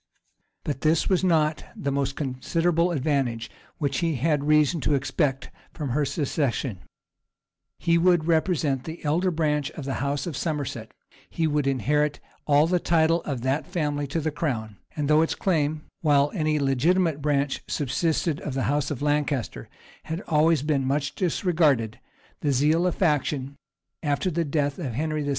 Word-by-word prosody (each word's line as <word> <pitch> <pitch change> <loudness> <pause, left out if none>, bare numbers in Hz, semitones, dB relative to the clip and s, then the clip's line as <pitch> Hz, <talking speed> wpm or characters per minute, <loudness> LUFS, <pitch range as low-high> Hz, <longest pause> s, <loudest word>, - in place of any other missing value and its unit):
But 140 -3 -3
this 160 +1 +2
was 190 -1 +2
not 160 -4 +2
the 140 - -2
most 135 -1 -1
considerable 165 +5 0
advantage 135 -7 -1 0.3
which 140 -3 -1
he 165 -3 0
had 145 +2 +1
reason 150 +1 +3
to 150 - +2
expect 135 0 -1 0.2
from 150 -5 -4
her 145 +4 +1
succession: 135 - -1 1.0
he 170 0 +2
would 175 -2 +3
represent 160 -5 +1
the 160 0 -8
elder 170 +6 +2
branch 150 -4 0
of 150 - -8
the 135 -2 -3
house 140 0 -1
of 170 -5 -4
Somerset; 150 -2 -3 0.4
he 165 - -1
would 150 -2 +1
inherit 145 +3 +1 0.3
all 145 +1 +5
the 180 +2 +1
title 165 0 +2
of 135 -5 -3
that 130 +4 -1
family 150 -5 -2
to 150 +5 -2
the 155 0 -1
crown; 115 -9 -3 0.2
and 150 -2 -1
though 150 +1 +5
its 165 - 0
claim, 155 -4 0 0.2
while 145 -2 +3
any 155 -4 +1
legitimate 150 +4 +2
branch 140 -1 0
subsisted 155 +2 0
of 140 - -4
the 135 - 0
house 145 0 0
of 145 -2 -4
Lancaster, 145 - -1 0.4
had 160 +3 -4
always 155 -2 +3
been 145 -3 +1
much 140 +2 -1
disregarded, 155 - +1 0.4
the 145 - 0
zeal 155 +6 +3
of 180 - -1
faction, 145 -5 0 0.5
after 150 +4 0
the 170 +1 0
death 145 0 -1
of 135 -9 -3
Henry 155 +2 -1
VI. 145 - -3
150 Hz, 165 wpm, -25 LUFS, 140-160 Hz, 1.0 s, all